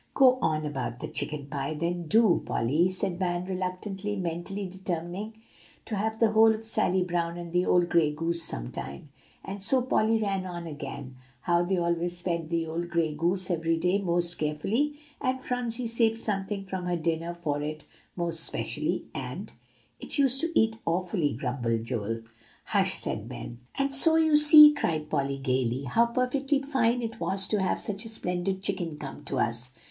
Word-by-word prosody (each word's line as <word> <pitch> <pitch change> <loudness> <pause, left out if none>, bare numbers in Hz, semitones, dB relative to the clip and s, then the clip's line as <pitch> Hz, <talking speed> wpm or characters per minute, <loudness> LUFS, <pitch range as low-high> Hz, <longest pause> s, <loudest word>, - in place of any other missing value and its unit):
"Go 255 -2 +6
on 155 -4 0
about 130 -5 -4
the - - -5
chicken 150 -2 -4
pie, 140 +2 -3
then, 170 +2 -2
do, 220 0 +4
Polly," 150 +10 +1
said 185 -1 -3
Van 175 -1 -1
reluctantly, 190 +2 -3
mentally 185 +2 -4
determining 185 +3 -5 0.5
to 220 - -3
have 220 +2 -2
the 225 -2 +4
whole 220 0 +6
of 220 +1 -9
Sally 190 -4 +1
Brown 170 -1 -2
and 170 -1 -7
the 180 +1 +2
old 175 -1 +4
gray 165 -4 +3
goose 165 +2 -1
some - - -4
time. 70 - -7 0.4
And 195 +1 -6
so 255 +7 +3
Polly 225 -3 +2
ran 195 -3 -1
on 175 -1 -6
again, 140 -4 -7 0.2
how 175 +3 +2
they 185 +2 0
always 170 0 -1
fed 170 -3 -2
the 165 -1 0
old 170 +2 -4
gray 165 -3 0
goose 180 +4 0
every 165 -1 +1
day 180 +4 +1
most 175 -1 0
carefully, 205 - 0 0.3
and 260 0 0
Phronsie 245 -1 -2
saved 230 -1 +1
something 195 -2 -3
from 190 -1 -4
her 175 -1 0
dinner 165 +1 -2
for 150 -4 -2
it 155 +1 -5 0.3
most 170 -2 -2
especially, - - -2
and - - -6 0.5
"It - - -5
used 270 -2 +3
to 330 0 +1
eat 220 0 +2
awfully," 175 -3 0
grumbled 120 -3 -2
Joel. 115 0 -3 0.4
"Hush!" - - +1
said - - -4
Ben. 115 - -8 0.2
"And 275 0 0
so 320 +4 +6
you 315 -2 +4
see," 300 0 +10
cried 155 - -2
Polly 140 -2 0
gayly, 130 -1 0
"how 230 - +3
perfectly 270 +4 0
fine 245 -4 +1
it 225 -1 -5
was 195 0 +2
to 210 -2 +1
have 190 - 0
such 205 0 -3
a 225 - -5
splendid 190 -2 -2
chicken 165 -6 -1
come 145 0 -8
to 135 - -2
us. 120 +1 -1
175 Hz, 180 wpm, -28 LUFS, 160-220 Hz, 0.5 s, see